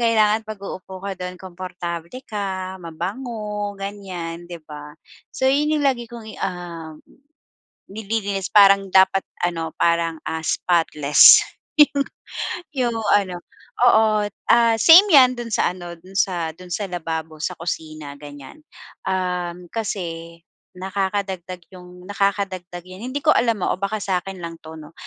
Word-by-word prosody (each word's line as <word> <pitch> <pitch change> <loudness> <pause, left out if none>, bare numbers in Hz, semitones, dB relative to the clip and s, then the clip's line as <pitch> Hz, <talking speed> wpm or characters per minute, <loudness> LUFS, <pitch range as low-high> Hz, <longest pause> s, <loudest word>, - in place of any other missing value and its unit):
kailangan 220 -2 +3
'pag 215 -2 -8
uupo 190 -1 -8
ka 195 +1 -4
do'n, 180 0 -6
komportable 175 -2 -6 0.2
ka, 190 -3 -4
mabango, 210 +4 -4
ganyan 185 -4 -6
'di 175 0 -8
ba. 150 -1 -9 0.4
So, 260 - -1
yun 300 +2 +2
lagi 260 -4 +1
kong 235 -2 -9
i - - -9
um, 170 -4 -6 0.9
nililinis 200 -2 -3
parang 195 -1 +6
dapat 190 0 +4 0.2
ano, 165 -2 -2
parang, 170 -1 +1
ah, 160 0 -3
spotless 155 -5 +6 0.4
yung 285 -2 +5 0.7
yung 240 -4 0 0.2
ano 185 -3 -3 0.5
oo, 215 -3 +4 0.3
ah, 235 -1 +5
same 345 - +9
'yan 255 -3 +8
do'n 235 -1 -5
sa 180 - +2
ano, 175 -1 -8
do'n 185 +3 -16
sa 170 -5 0
do'n 180 0 -13
sa 205 - -2
lababo, 160 -2 -4
sa 180 - -2
kusina, 155 -3 -5
ganyan. 145 - -11 0.5
Um, 180 -1 -2
kasi 170 -6 -4 0.4
nakakadagdag 190 -2 -3
yung 180 0 -13
nakakadagdag 195 -3 -2
'yan 185 +5 -9
hindi 285 - -2
ko 305 - +1
alam 230 -5 +1
ah - - +1
o - - -21
baka 205 +2 -1
sa'kin 190 0 -2
lang 165 0 -6
'to, 160 0 -10
'no. 155 +1 -12
185 Hz, 140 wpm, -22 LUFS, 170-210 Hz, 0.9 s, same